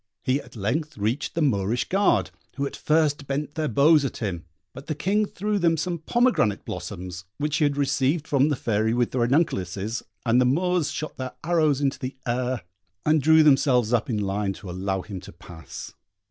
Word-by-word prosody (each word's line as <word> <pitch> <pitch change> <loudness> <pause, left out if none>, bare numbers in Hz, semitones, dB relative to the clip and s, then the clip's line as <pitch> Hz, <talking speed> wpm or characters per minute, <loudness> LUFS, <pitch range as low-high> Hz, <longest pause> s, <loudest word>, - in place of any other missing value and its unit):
He 130 +3 +1
at - - -16
length 145 +9 -2
reached 110 +8 -2
the 165 - +1
Moorish 110 -3 +1
guard, 195 +1 +2 0.2
who 140 - -1
at - - -5
first 150 -2 +1
bent 145 +1 -2
their 155 -1 -1
bows 145 +5 +5
at 135 - -3
him, 90 -7 -4 0.3
but 135 - -11
the 155 - -2
King 205 +7 +1
threw 205 +2 -2
them 165 -2 +3
some 170 +2 -2
pomegranate 200 - +1
blossoms, 90 -1 -6
which 150 +1 -1
he 155 - +3
had 145 -1 0
received 140 +2 +1
from 140 +1 +3
the 145 - +1
Fairy 110 -1 0
with 120 -1 +1
the 130 - -1
ranunculuses, 115 - 0 0.2
and 120 +2 +4
the - - +4
Moors 170 +3 +1
shot 155 +1 -5
their 130 -1 -5
arrows 155 -4 +2
into 135 -2 0
the 130 +1 -5
air, 125 -2 -1 0.4
and 155 0 +3
drew 160 +2 +6
themselves 130 -5 +4
up 120 +4 +1
in 115 - 0
line 100 0 -1
to 95 -1 -9
allow 95 +1 -2
him 95 -1 -7
to - - -11
pass. 80 -5 -10
135 Hz, 195 wpm, -25 LUFS, 110-155 Hz, 0.4 s, drew